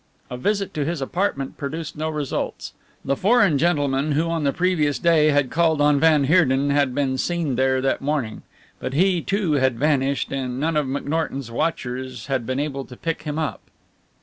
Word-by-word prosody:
A - - -3
visit 200 +8 -1
to 150 - -1
his 165 +2 -2
apartment 140 -1 -2
produced 155 +3 -5
no 155 +1 -2
results. 150 -3 -4 0.3
The 140 - +1
"foreign 200 - +3
gentleman" 145 -3 +1
who 160 +3 +1
on 165 -3 -1
the 140 - +3
previous 160 -5 +1
day 160 +2 +4
had 145 -3 +2
called 160 -1 +2
on 145 -1 +4
van 155 -2 +4
Heerden 140 -3 +3
had 140 -3 +1
been 135 -2 0
seen 170 -6 -1
there 130 +1 +2
that 135 - 0
morning, 140 -6 -2 0.4
but 130 - -4
he, 180 +1 +3
too, 195 -1 -1
had 130 -4 +2
vanished, 140 -1 +1
and 130 -2 -3
none 160 +2 0
of 150 -3 +1
McNorton's 140 -2 -3
watchers 125 -2 -3
had 130 -4 -2
been 130 +1 -1
able 140 -2 -3
to 125 - -12
pick 165 -1 -3
him 150 -1 -4
up. 160 -2 -2
145 Hz, 185 wpm, -22 LUFS, 135-160 Hz, 0.4 s, day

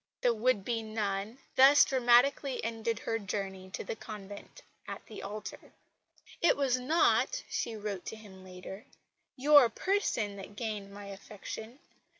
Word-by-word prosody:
The 245 - +3
would 225 -3 +1
be 230 -2 -1
nun 215 0 -3 0.2
thus 275 +2 +8
dramatically 255 +1 +3
ended 225 0 -2
her 225 0 -2
journey 190 -2 -5
to - - -5
the - - -4
convent 205 -2 -10 0.2
at - - -7
the 215 - -9
altar. 205 0 -8 0.7
"It 340 - +4
was 260 -3 +2
not," 330 - +2
she 230 - -3
wrote 205 -3 -4
to - - -5
him 200 -4 -13
later, 185 +5 -10 0.5
"your 285 -2 +7
person 225 - -1
that 200 +1 -10
gained 210 -3 -4
my 200 0 -9
affection. 210 +4 -8
220 Hz, 145 wpm, -31 LUFS, 200-250 Hz, 0.7 s, thus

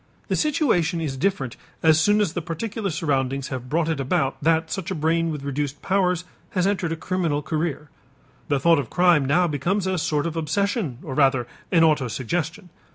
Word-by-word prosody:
The - - +1
situation 225 - +1
is 150 -5 -3
different 135 -5 -1 0.3
as 160 -1 +5
soon 205 +5 +4
as 195 -6 0
the 175 - -2
particular 195 +5 -3
surroundings 140 -4 -1
have 125 -2 -5
brought 160 +2 +1
it 160 -3 -1
about 135 0 0
that 160 0 +2
such 190 0 -3
a 190 - -2
brain 165 +2 +1
with 150 -3 -4
reduced 140 0 -3
powers 180 -2 +1 0.3
has 180 -1 +1
entered 190 -4 0
a - - 0
criminal 165 -4 -1
career. 155 -2 -3 0.6
The 145 -2 +1
thought 165 +2 +4
of 125 -6 -4
crime 175 -5 +4
now 155 +7 +3
becomes 175 +6 0
a 190 -1 0
sort 150 -2 0
of 170 -1 -3
obsession 180 - -1
or - - -5
rather 135 -3 +3 0.3
an 165 -2 +5
autosuggestion. 155 - 0
160 Hz, 185 wpm, -23 LUFS, 145-180 Hz, 0.6 s, as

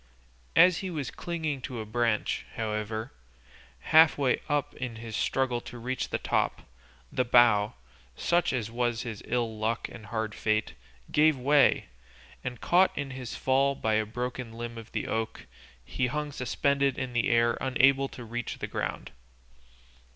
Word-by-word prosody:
As 180 -1 +6
he 190 - -4
was 150 -7 -4
clinging 160 -5 -3
to 125 -2 -5
a 110 - -4
branch, 115 0 0
however, 110 0 -3 0.8
half 160 0 +7
way 135 -3 +1
up 145 -1 0
in 125 -3 -5
his 115 -1 -7
struggle 125 -1 0
to 120 - -9
reach 125 +2 -3
the - - 0
top, - - -1 0.5
the 125 - +1
bough, 120 -4 +4 0.4
such 175 - +1 0.2
was 120 0 -1
his 110 -4 -6
ill 115 -3 -1
luck 110 0 -1
and 110 -3 -11
hard 110 0 -2
fate, 110 +1 0 0.4
gave 155 -1 +4
way, 140 +2 +4 0.6
and 125 -2 -5
caught 185 +2 +3
in 140 -2 -3
his 130 -2 -6
fall 135 +1 +2
by 110 -4 0
a 110 0 +2
broken 125 +1 -4
limb 120 0 -6
of 115 -1 -10
the - - -2
oak, 110 0 -3 0.4
he 65 - -1
hung 150 +3 -3
suspended 140 +1 0
in 130 -2 -4
the 120 -2 +1
air 115 0 +3
unable 135 +1 +3
to 120 -2 -10
reach 120 +1 -4
the - - -4
ground. - - -4
125 Hz, 160 wpm, -28 LUFS, 115-135 Hz, 0.8 s, half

